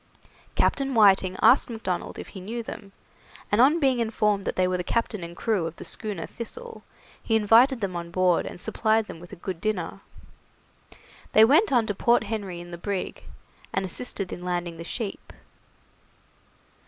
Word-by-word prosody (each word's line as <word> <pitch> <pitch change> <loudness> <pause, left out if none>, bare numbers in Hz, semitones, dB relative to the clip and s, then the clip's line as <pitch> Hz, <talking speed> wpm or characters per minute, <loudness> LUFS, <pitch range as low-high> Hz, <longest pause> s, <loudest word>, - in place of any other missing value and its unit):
Captain 270 -2 +1
Whiting 190 -3 +5
asked 260 - +6
Macdonald 220 -6 -4
if - - -8
he 190 - -9
knew 230 +5 -5
them, 200 -2 -9 0.6
and 205 +3 +4
on 295 +6 +5
being 265 -4 +2
informed 210 -3 +1
that - - -2
they 185 0 +2
were 185 0 0
the 180 - -3
captain 215 -1 -1
and 170 0 -8
crew 205 -8 0
of 165 - -8
the - - -9
schooner 205 -7 -4
'Thistle', 470 - -8 0.4
he 225 - 0
invited 230 +4 +5
them 190 -3 -2
on 170 0 -5
board 180 0 +2
and - - -8
supplied 220 +3 +1
them 165 - -9
with 175 +1 -13
a - - -7
good 180 -1 -6
dinner. 195 -3 -2 1.3
They 220 - +8
went 315 - +4
on 240 -4 +3
to 205 - -1
Point 235 +4 +3
Henry 200 -6 -4
in 175 0 -10
the 170 - -7
brig, 195 +1 -4 0.5
and 195 - -1
assisted 195 0 -4
in 180 - -8
landing 175 -2 -3
the 165 - -7
sheep. 205 +4 -6
205 Hz, 180 wpm, -26 LUFS, 180-230 Hz, 1.3 s, They